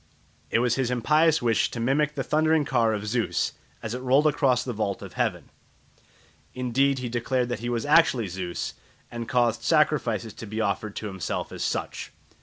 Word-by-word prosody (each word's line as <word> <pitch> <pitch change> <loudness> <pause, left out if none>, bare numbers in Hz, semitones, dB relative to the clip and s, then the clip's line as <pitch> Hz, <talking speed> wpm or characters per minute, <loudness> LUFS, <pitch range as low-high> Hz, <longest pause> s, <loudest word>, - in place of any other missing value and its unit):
It - - +2
was 120 0 +1
his 130 -2 0
impious 150 +5 +3
wish 115 -2 +2
to 120 - -6
mimic 145 +5 +1
the 135 - -2
thundering 155 +1 +2
car 120 -4 +2
of 105 -1 -3
Zeus 115 +2 0 0.3
as 110 - -4
it 125 - -3
rolled 130 +4 +3
across 135 -4 +2
the 125 - -4
vault 105 -2 -2
of - - -9
heaven. - - -2 1.0
Indeed 130 +2 +1
he 125 -1 -3
declared 120 +1 -1
that 120 -4 -3
he 120 +2 -4
was 120 0 -1
actually 145 -6 +4
Zeus, 90 -1 -4 0.4
and 120 0 -5
caused 120 -3 +2
sacrifices - - +1
to 115 - -9
be 110 +2 -4
offered 105 0 -1
to - - -5
himself 95 -4 -4
as - - -5
such. - - -3
125 Hz, 185 wpm, -26 LUFS, 115-135 Hz, 1.0 s, actually